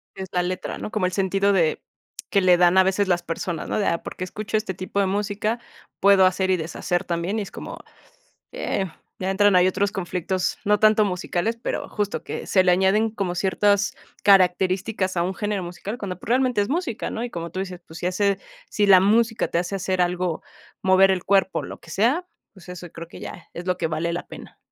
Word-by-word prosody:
Es 190 -1 -6
la 180 -1 +1
letra, 185 +1 -4
¿no?, - - -6
como 215 -5 0
el 180 - 0
sentido 195 +1 +2
de, 165 -5 +2 0.5
que 200 - +3
le 180 -1 +5
dan 180 +1 +4
a 190 - +8
veces 190 +1 +1
las 175 -1 +1
personas, 165 0 -4
¿no?, - - 0
de: 200 - +1
"Ah, 170 - 0
por - - -7
qué 185 - -3
escucho 215 +3 -3
este 210 -3 -3
tipo 185 +3 -4
de 200 - +3
música, 205 +3 -1 0.4
puedo 195 -1 +6
hacer 185 +1 +1
y 185 - +3
deshacer 170 +2 -2
también", 175 +5 -2
y 210 - -2
es - - -10
como, - - -8 0.8
eh, 190 - -2 0.3
ya 190 +1 -2
entran, 205 -1 +4
hay 180 - +5
otros 195 +2 +1
conflictos, 185 -1 -2
no 210 0 +3
tanto 215 0 +5
musicales, 190 +4 -2
pero - - -3
justo 205 -1 -2
que - - -6
se 185 - +4
le 180 - +3
añaden 190 +5 +3
como 195 -5 -3
ciertas 200 +2 +1 0.3
características 190 0 +3
a 170 - +2
un 190 +1 -2
género 205 -2 -2
musical, 195 +6 -6
cuando, 185 -3 -5
pues, - - -11
realmente 250 -2 +2
es 200 - 0
música, 310 -7 -2
¿no?, 230 - -3
y 245 - -5
como 170 -1 -5
tú 185 - -6
dices, 185 -2 -5
pues, 160 - -10
si 175 - -3
hace 200 +1 +1 0.3
si 205 -1 +1
la 190 -2 +8
música 225 +3 +2
te 170 - 0
hace 180 +3 -2
hacer 190 -1 -1
algo, 180 -1 0 0.4
mover 190 +1 +6
el 185 -1 0
cuerpo, 195 -1 +2
lo - - -9
que - - -15
sea, 255 - +1 0.3
pues, 190 -2 -17
eso 180 -1 -8
creo 170 0 -9
que - - -11
ya 180 - -9
es 175 - -7
lo 180 -1 +1
que 165 -2 -1
vale 165 +2 -2
la 175 - -4
pena. - - -11
190 Hz, 225 wpm, -23 LUFS, 180-205 Hz, 0.8 s, a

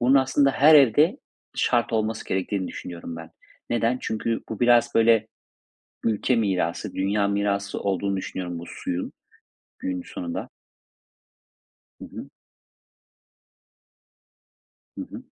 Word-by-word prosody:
Bunun 125 +3 +4
aslında 135 +1 +4
her 150 +4 +6
evde 150 - +5 0.4
şart 120 -1 +1
olması 110 0 -1
gerektiğini 95 0 -2
düşünüyorum 85 -1 -7
ben. 80 -1 -9 0.4
Neden? 120 +1 +1
Çünkü 115 +1 -2
bu 110 - -6
biraz, 120 -1 +4
böyle, 115 -1 +4 0.8
ülke 115 +3 +1
mirası, 95 -2 -1
dünya 100 +1 +1
mirası 100 0 -1
olduğunu 100 0 -1
düşünüyorum 90 -2 -5
bu 85 - -8
suyun, 90 +1 -4 0.7
günün 90 -1 -3
sonunda. 85 -1 -5 1.5
Hı - - -9
hı. - - -9 2.7
Hı - - -3
hı. - - -8
105 Hz, 110 wpm, -25 LUFS, 95-120 Hz, 2.7 s, her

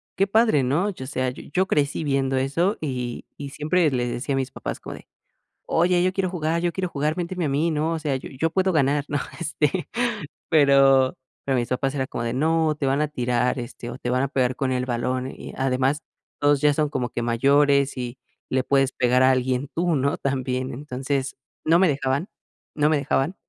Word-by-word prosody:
“Qué 195 - +2
padre", 220 -7 +3
¿no? 150 +11 +1
Yo, 130 -9 -8
o - - -8
sea, 130 -2 -1
yo - - -10
yo 185 +4 +2
crecí 150 -2 0
viendo 135 -2 0
eso, 165 +10 +1
y 125 -5 -4
y 140 -1 -6
siempre 155 +3 +1
le 125 -2 -1
decía 130 +3 -2
a - - 0
mis 130 0 -2
papás - - -5
como - - -8
de: - - -14 0.6
“Oye, 175 +1 +3
yo 185 - +1
quiero 185 -1 -1
jugar, 165 0 -1
yo 175 - +1
quiero 185 0 -2
jugar, 150 +1 -1
méteme 175 -1 -2
a - - 0
mí", 150 +5 +1
¿no? 160 +1 0
O 165 - -2
sea, 150 -3 -1
"yo 130 - -6
yo 150 +5 -1
puedo 190 +2 +1
ganar", 145 -1 +2
¿no? 145 - -1 0.2
Este, 160 +1 -1 0.6
pero 135 -3 +5 0.3
pero 135 - +1
mis 120 - -1
papás 135 +2 -1
era 130 -2 -2
como 115 - -4
de: 115 - -2
“No, 160 +3 +2
te 145 -2 -2
van 140 +3 +1
a 150 - +1
tirar, 125 -2 0
este, 120 0 -7
o, 120 - -9
te 125 - -3
van 130 +2 +1
a 140 - -1
pegar 130 -3 +1
con 130 -1 -1
el 125 0 0
balón, 125 +2 -1
y - - -9
además 135 +3 +1 0.4
todos 145 -1 +3
ya 150 0 +4
son 150 0 0
como 125 -4 -2
que 120 - -4
mayores, 140 +4 +3
y 125 0 -5 0.3
le 130 0 +1
puedes 135 0 +2
pegar 125 0 +2
a 130 - +6
alguien 130 +1 0
tú, 170 -1 +1
¿no?, 140 +1 0
también”. 130 -2 -2
Entonces, 135 0 -3 0.3
no 165 +2 +5
me 190 - +5
dejaban. 140 +4 -1 0.5
No 150 0 +3
me 155 - +3
dejaban, 140 +4 0
140 Hz, 215 wpm, -24 LUFS, 130-155 Hz, 0.6 s, a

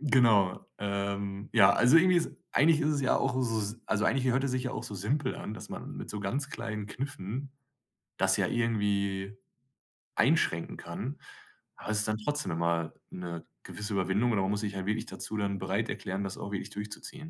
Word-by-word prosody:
Genau, 115 -10 +4
ähm, 100 0 -2
ja, 100 -4 +7
also 125 +6 +6
irgendwie 180 +2 +6
ist 165 - -1 0.2
eigentlich 155 +1 +5
ist 150 - +2
es 150 -2 +1
ja 130 - +3
auch 130 -2 +1
s 115 -3 -1
also 110 0 +1
eigentlich 130 -1 +2
hört 135 +2 +2
es 135 - 0
sich 130 0 0
ja 125 - -1
auch - - -4
so 105 - -6
simpel 130 +9 0
an, 105 - -5
dass - - -8
man - - -7
mit - - -6
so 105 - -4
ganz 135 +8 -1
kleinen 110 -4 -4
Kniffen, 130 +2 -5 0.7
das - - +3
ja - - +2
irgendwie 100 -4 0 0.8
einschränken 85 0 +2
kann, 110 - -5 0.6
aber - - -9
es 105 - +2
ist 105 - +1
dann 110 0 0
trotzdem 145 +3 -1
immer 85 0 0 0.2
'ne 85 -2 -6 0.2
gewisse 105 0 -5
Überwindung 100 +5 +2
oder 105 -4 +2
man 95 - +1
muss 105 - 0
sich 105 -2 -3
halt 95 -1 -3
wirklich 110 +2 -1
dazu 110 - -5
dann 100 -1 0
bereit 95 +4 -1
erklären, 95 +1 -3
das 95 - -4
auch 100 - -6
wirklich 100 - -3
durchzuziehen. 105 +10 -7
105 Hz, 200 wpm, -30 LUFS, 100-130 Hz, 0.8 s, ja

